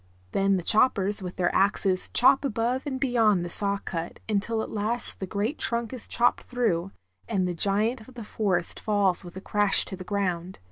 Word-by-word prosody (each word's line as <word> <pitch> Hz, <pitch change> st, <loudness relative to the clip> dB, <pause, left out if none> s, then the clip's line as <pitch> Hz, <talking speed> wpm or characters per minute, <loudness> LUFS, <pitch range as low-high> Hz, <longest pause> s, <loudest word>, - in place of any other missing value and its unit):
Then 195 Hz, 0 st, +1 dB
the 180 Hz, -, -5 dB
choppers 210 Hz, -2 st, +3 dB
with 180 Hz, -1 st, -7 dB
their 175 Hz, -2 st, 0 dB
axes 195 Hz, -1 st, +1 dB
chop 260 Hz, +3 st, +4 dB
above 250 Hz, +2 st, -2 dB
and 265 Hz, -2 st, -3 dB
beyond 225 Hz, -9 st, +2 dB
the 175 Hz, -, -6 dB
saw 200 Hz, +1 st, +2 dB
cut 170 Hz, -3 st, -6 dB
until 220 Hz, +1 st, -1 dB
at -, -, -8 dB
last 220 Hz, +3 st, -2 dB
the 190 Hz, -, -5 dB
great 215 Hz, -, -3 dB
trunk 235 Hz, 0 st, 0 dB
is 250 Hz, -, -7 dB
chopped 240 Hz, +1 st, +1 dB
through, 195 Hz, -8 st, -1 dB, 0.4 s
and 190 Hz, -5 st, -1 dB
the 180 Hz, -, -2 dB
giant 215 Hz, +6 st, +2 dB
of 260 Hz, -, -16 dB
the 235 Hz, -, -7 dB
forest 195 Hz, -5 st, -2 dB
falls 200 Hz, -4 st, +1 dB
with 175 Hz, 0 st, -12 dB
a -, -, -7 dB
crash 205 Hz, 0 st, +3 dB
to 190 Hz, -, -7 dB
the 185 Hz, -, -9 dB
ground. 185 Hz, -2 st, -3 dB
205 Hz, 195 wpm, -26 LUFS, 185-230 Hz, 0.4 s, chop